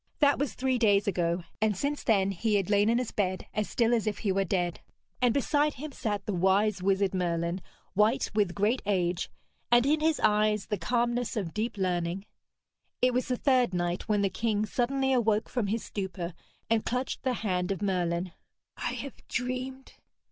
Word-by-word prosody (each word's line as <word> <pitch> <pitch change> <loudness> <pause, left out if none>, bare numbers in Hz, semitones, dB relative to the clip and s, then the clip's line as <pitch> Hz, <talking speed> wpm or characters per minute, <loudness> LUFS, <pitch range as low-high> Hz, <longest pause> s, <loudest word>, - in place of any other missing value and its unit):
That 285 -2 +4
was 285 -1 -1
three 260 -1 0
days 205 -2 +3
ago, 175 -2 0 0.2
and 215 -3 +2
since 285 +6 -1
then 195 -3 +3
he 210 +3 0
had 200 0 0
lain 205 +1 +4
in 235 - +3
his 250 -2 -2
bed 185 -2 -1
as 215 0 -1
still 235 0 +2
as 225 -2 +1
if 210 - -1
he 205 - -1
were 195 +1 +2
dead; 175 -2 -1 0.4
and 245 -1 +4
beside 290 +3 +1
him 295 +3 -6
sat 205 -6 -3
the 210 - -2
wise 190 +2 +2
wizard 195 0 +2
Merlin, 170 0 -1 0.3
white 210 +3 +2
with 205 -4 +1
great 215 +6 +1
age, 180 -3 0 0.4
and 240 +1 +6
in 300 +2 +3
his 315 0 +2
eyes 210 -1 +3
the 210 - -2
calmness 240 +4 0
of 180 -6 -3
deep 215 +1 -2
learning. 180 0 -1 0.7
It 250 0 +3
was 250 +1 0
the 250 -1 0
third 250 -8 +2
night 175 +3 -2
when 205 -1 +2
the 195 - +2
king 215 +1 0
suddenly 265 +4 0
awoke 220 -3 +2
from 240 -5 -1
his 220 +3 -1
stupor 190 -3 -4 0.3
and 225 -1 +2
clutched 250 +2 -2
the 260 -1 0
hand 185 -5 -1
of 195 +1 -3
Merlin. 180 -2 0 0.5
'I - - -2
have 280 - -8
dreamed!' 255 +2 -4
210 Hz, 190 wpm, -29 LUFS, 190-245 Hz, 0.7 s, and